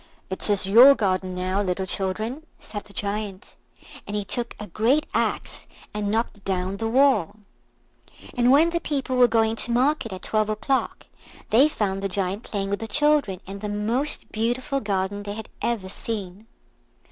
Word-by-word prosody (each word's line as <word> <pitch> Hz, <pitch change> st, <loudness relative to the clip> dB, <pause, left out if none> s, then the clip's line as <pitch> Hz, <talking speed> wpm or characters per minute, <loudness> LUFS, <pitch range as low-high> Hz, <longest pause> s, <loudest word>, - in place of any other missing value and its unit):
"It 190 Hz, -, 0 dB
is 200 Hz, -2 st, +4 dB
your 245 Hz, +8 st, +8 dB
garden 185 Hz, -4 st, -1 dB
now, 185 Hz, +2 st, -1 dB
little 190 Hz, -1 st, -1 dB
children," 215 Hz, -, -2 dB, 0.2 s
said 205 Hz, -2 st, -7 dB
the -, -, -17 dB
Giant, 205 Hz, -1 st, -4 dB, 0.5 s
and 205 Hz, -, -4 dB
he 205 Hz, -1 st, -2 dB
took 235 Hz, +3 st, -3 dB
a 210 Hz, -, -6 dB
great 235 Hz, -, +1 dB
axe -, -, -1 dB, 0.3 s
and 210 Hz, -1 st, -2 dB
knocked 220 Hz, -2 st, -2 dB
down 190 Hz, 0 st, -2 dB
the 225 Hz, -, -2 dB
wall. 225 Hz, -, +3 dB, 1.0 s
And 245 Hz, -1 st, +3 dB
when 310 Hz, +6 st, +5 dB
the 340 Hz, -, 0 dB
people 270 Hz, -3 st, -2 dB
were 250 Hz, -1 st, +6 dB
going 225 Hz, -1 st, +2 dB
to 240 Hz, -, -1 dB
market 255 Hz, -1 st, +1 dB
at 185 Hz, -1 st, -7 dB
twelve 215 Hz, -1 st, 0 dB
o'clock 220 Hz, +5 st, -1 dB, 0.5 s
they 260 Hz, +7 st, +6 dB
found 195 Hz, -9 st, -2 dB
the 195 Hz, -, -2 dB
Giant 195 Hz, +2 st, -2 dB
playing 200 Hz, -4 st, -3 dB
with 200 Hz, -, -1 dB
the 225 Hz, -, -5 dB
children 295 Hz, -10 st, +2 dB
in 195 Hz, +1 st, -7 dB
the 210 Hz, +1 st, -4 dB
most 230 Hz, +8 st, -1 dB
beautiful 245 Hz, +5 st, -1 dB
garden 200 Hz, -2 st, -2 dB
they 205 Hz, 0 st, -5 dB
had 220 Hz, +1 st, -8 dB
ever 225 Hz, -5 st, -1 dB
seen. 200 Hz, 0 st, -6 dB
210 Hz, 170 wpm, -24 LUFS, 195-245 Hz, 1.0 s, your